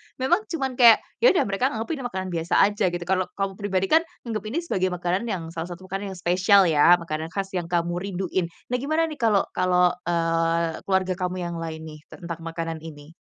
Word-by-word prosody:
memang 345 +12 +1
cuman 270 -6 -2
kayak 235 -3 +8 0.2
ya 485 - +5
udah - - +4
mereka 200 +6 0
anggapnya 225 +9 -3
ini - - -6
makanan 190 -5 -5
biasa 165 +1 -2 0.2
aja 205 +1 -3
gitu, 175 -1 -3
kalau 185 +1 0
kamu 195 -1 -1
pribadi 195 -2 0
kan 320 - +6 0.2
nganggep 220 -4 -4
ini 240 +9 -3
sebagai 185 - 0
makanan 175 +3 -1
yang 185 -6 -3
salah 165 0 -5
satu 175 +2 -9
makanan 195 0 -4
yang - - -11
spesial 185 +3 +5
ya, 165 +1 +6
makanan 160 -2 -4
khas 195 -1 -3
yang 175 -3 -3
kamu 175 0 -1
rinduin. 185 -2 -2 0.2
Nah 250 - +2
gimana 310 +5 0
nih 300 - -8
kalau 220 -5 +3
kalau, 180 -1 +3 0.2
eee, 165 -1 0
keluarga 190 -1 +1
kamu 180 0 -2
yang 170 0 -4
lain 160 -1 -6
nih, 155 -1 -9
tentang 170 -2 -8
makanan 165 -1 -5
ini? 155 -1 -11
185 Hz, 210 wpm, -24 LUFS, 170-205 Hz, 0.2 s, kayak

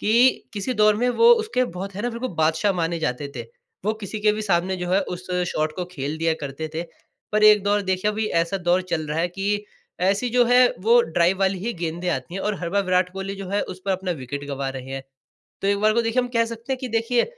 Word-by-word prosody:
कि 215 - +1 0.4
किसी 210 +4 -2
दौर 215 0 +5
में 245 +3 +1
वो 460 - +4
उसके 440 - +1
बहुत 195 -1 -6
है 205 - -4
ना, 240 - 0
बिल्कुल 235 +2 -4
बादशाह 160 +5 +2
माने 170 -1 -1
जाते 140 -1 -2
थे। - - -3 0.4
वो 215 - +2
किसी 210 +1 -5
के 210 0 +4
भी 215 +1 -3
सामने 185 -1 +1
जो 180 -1 -4
है, 190 - +4
उस 180 -1 -6 0.2
शॉट 155 0 -1
को 180 - -2
खेल 145 0 -4
दिया 165 0 +2
करते 145 +3 -5
थे। 165 - -1 0.5
पर 215 0 +2
एक 210 -1 +7
दौर 205 0 +1
देखिए 190 +2 0
अभी 215 +1 -2
ऐसा 170 +4 -1
दौर 180 0 +1
चल 160 -2 -1
रहा 150 +2 -2
है 175 +1 +1
कि 205 +3 -2 0.4
ऐसी 200 +6 +1
जो 245 0 +4
है 245 +1 +5 0.2
वो 235 +3 +6
ड्राइव 170 +3 +1
वाली 190 0 +2
ही 225 +6 -3
गेंदें 170 +1 -3
आती 170 +1 -4
हैं 195 - -3
और 210 0 0
हर 170 - -2
बार 200 +2 +2
विराट 180 0 +2
कोहली 195 +1 -5
जो 195 -1 -7
है 200 +2 0
उस 185 - -8
पर 195 - -1
अपना 185 0 -2
विकेट 140 +3 -5
गँवा 140 -1 -3
रहे 135 0 -7
हैं। 135 0 -4 0.6
तो 195 - +1
एक 200 0 +2
बार 215 0 +4
को 235 - +3
देखिए 230 +2 +1
हम 245 - -4
कह 230 0 +4
सकते 230 +3 -5
हैं 260 - -2
कि 255 - -4
देखिए 230 +2 +1
195 Hz, 255 wpm, -23 LUFS, 170-215 Hz, 0.6 s, एक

